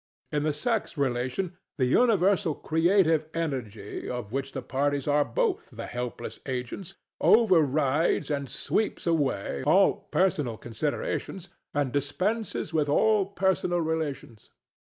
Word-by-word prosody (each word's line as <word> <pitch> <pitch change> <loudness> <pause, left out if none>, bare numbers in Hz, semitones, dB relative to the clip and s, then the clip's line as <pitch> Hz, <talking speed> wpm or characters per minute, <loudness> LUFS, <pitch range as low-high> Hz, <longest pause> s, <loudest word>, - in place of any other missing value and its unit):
In 150 - 0
the 155 +1 +1
sex 210 +5 -2
relation 135 +7 -1 0.2
the 130 - +2
universal 195 - +3
creative 165 -1 +2
energy, 125 -11 -4
of 125 -4 -5
which 135 0 -2
the 135 - -4
parties 140 +1 -1
are 145 0 +4
both 445 - -1
the - - -7
helpless 125 -1 -5
agents, 130 +9 -5 0.2
over 215 -7 +5
rides 150 +2 +1
and 140 -2 -2
sweeps 215 - -1
away 145 - 0
all 180 +8 +5 0.2
personal 150 -11 +1
considerations 150 - -3 0.3
and 145 -3 +1
dispenses 185 - -1
with 150 -2 +1
all 210 +5 +3
personal 190 -2 +1
relations. 155 -8 -4
150 Hz, 125 wpm, -27 LUFS, 135-190 Hz, 0.3 s, over